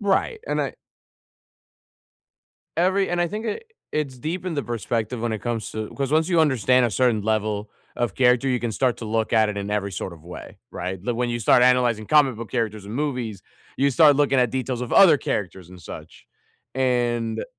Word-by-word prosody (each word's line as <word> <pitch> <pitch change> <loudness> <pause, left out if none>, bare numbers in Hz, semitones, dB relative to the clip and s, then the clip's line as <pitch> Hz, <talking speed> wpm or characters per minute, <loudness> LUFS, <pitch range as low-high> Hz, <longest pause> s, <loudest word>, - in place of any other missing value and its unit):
Right, 205 - 0
and - - -1
I - - -3 2.0
Every 190 +3 +2
and 175 0 -1
I 175 - +1
think 215 +4 -5
it 225 - -4 0.3
it's 140 -4 -2
deep 170 +7 -4
in 180 -3 -3
the 145 - -1
perspective 115 0 -3
when 115 -1 -1
it 110 - -2
comes 115 -3 -3
to 110 -1 -5
'cause 140 -1 -2
once 160 +2 +3
you 170 -3 +3
understand 130 -4 +3
a 115 - -3
certain 120 -1 +1
level 105 -1 -1 0.3
of 120 -1 -1
character, 125 +1 +3
you 125 - +1
can 120 -1 -3
start 125 +2 +1
to 115 - -7
look 110 +1 -1
at 110 -2 +4
it 105 - -4
in 100 +1 -4
every 100 -2 -2
sort 90 - -5
of 80 -2 -15
way, 90 -1 -10
right? 90 +1 -4
But 120 +4 -2
when 120 +1 -1
you 120 - -2
start 120 +2 +4
analyzing 125 -3 +3
comic-book 130 -7 +2
characters 110 -4 -2
and 105 - -7
movies, 125 -8 -3 0.4
you 140 +1 +2
start 145 +1 +6
looking 140 -2 +2
at 125 - +2
details 130 -2 -3
of 125 - -5
other 185 -6 +7
characters 95 - -4
and 90 -1 -13
such, 80 - -11 0.5
and 120 -3 0
120 Hz, 200 wpm, -23 LUFS, 110-140 Hz, 2.0 s, other